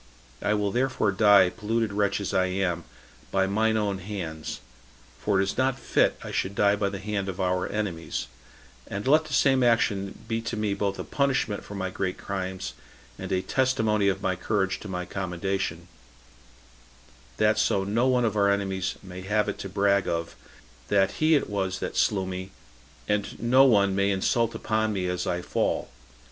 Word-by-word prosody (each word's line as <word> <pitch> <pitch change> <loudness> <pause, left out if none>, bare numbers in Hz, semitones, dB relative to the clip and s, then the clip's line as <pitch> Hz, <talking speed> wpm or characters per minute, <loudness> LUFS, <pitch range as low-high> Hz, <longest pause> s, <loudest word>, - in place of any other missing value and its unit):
I 105 +1 +1
will 105 -1 0
therefore 125 -3 +1
die, 100 -2 +6
polluted 115 -1 -1
wretch 100 -1 +1
as 100 - -3
I 95 - +3
am, 90 -3 -1 0.4
by 95 0 +2
mine 110 +3 +1
own 100 -3 -1
hands; 90 -5 -5 0.6
for 100 -2 +1
it - - +4
is 100 - -3
not 130 0 +2
fit - - +2
I - - -6
should 95 +2 -2
die 100 0 +4
by 100 -1 0
the 100 - -5
hand 100 -1 -3
of 95 - -6
our 90 -1 0
enemies; 95 -6 -3 0.6
and 100 +4 -4
let 155 +3 +5
the 155 - -7
same 135 -2 +4
action 110 -5 +1
be 115 0 -1
to 115 0 -4
me 105 -1 0
both 100 -1 -1
a - - -4
punishment 135 -7 0
for 100 - -9
my 95 -1 -3
great 95 -1 -2
crimes, 95 -1 -4 0.5
and - - -6
a 95 0 +1
testimony 110 -6 +1
of 95 - 0
my 95 -1 +1
courage 95 +1 -1
to - - -9
my 90 -2 -4
commendation, 95 +1 -3 1.5
that 110 0 +3
so 100 -2 +2
no 110 +6 +1
one 125 -2 +3
of 110 -2 0
our 100 -1 +3
enemies 95 -1 -1
may 95 -1 -8
have 105 +2 +1
it - - -3
to 95 - -5
brag 100 0 +2
of, 85 0 -2 0.5
that 95 -2 +3
he 155 +1 +5
it 145 - +1
was 95 -2 -2
that - - -5
slew 95 -3 +2
me, 95 0 -5 0.6
and 105 -1 -1
no 130 +3 +5
one 100 -6 +4
may 100 0 +2
insult 115 +4 +1
upon 110 0 0
me 95 -2 -2
as 90 0 -2
I 90 0 -1
fall." - - -1
100 Hz, 185 wpm, -26 LUFS, 95-110 Hz, 1.5 s, die